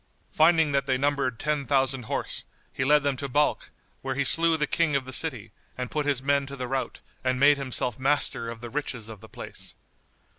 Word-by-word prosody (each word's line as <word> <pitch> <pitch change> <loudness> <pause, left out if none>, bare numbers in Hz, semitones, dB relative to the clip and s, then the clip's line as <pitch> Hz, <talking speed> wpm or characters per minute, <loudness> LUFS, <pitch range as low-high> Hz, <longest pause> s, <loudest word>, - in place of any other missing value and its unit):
Finding 160 -1 +4
that 140 0 0
they 130 -1 +2
numbered 135 -3 0
ten 150 -1 -2
thousand 135 -3 +1
horse, - - -2 0.3
he 130 - -2
led 150 +1 +4
them 140 -1 +1
to 140 0 -5
Balkh, 150 +3 +1 0.3
where 135 -1 -3
he 140 - +1
slew 165 +4 +5
the 150 - +1
King 165 -1 0
of 135 -2 0
the 130 - -7
city - - +1 0.3
and 125 - -5
put 150 -1 -1
his 135 -3 0
men 140 0 +1
to 140 - -7
the 130 -2 -4
rout 135 +1 -3 0.2
and 130 0 0
made 145 +1 +6
himself 130 -3 -1
master 135 -4 +1
of 115 -1 -8
the 120 - -7
riches 130 -6 -4
of 110 -4 -10
the - - -13
place. - - -8
140 Hz, 215 wpm, -26 LUFS, 130-145 Hz, 0.3 s, made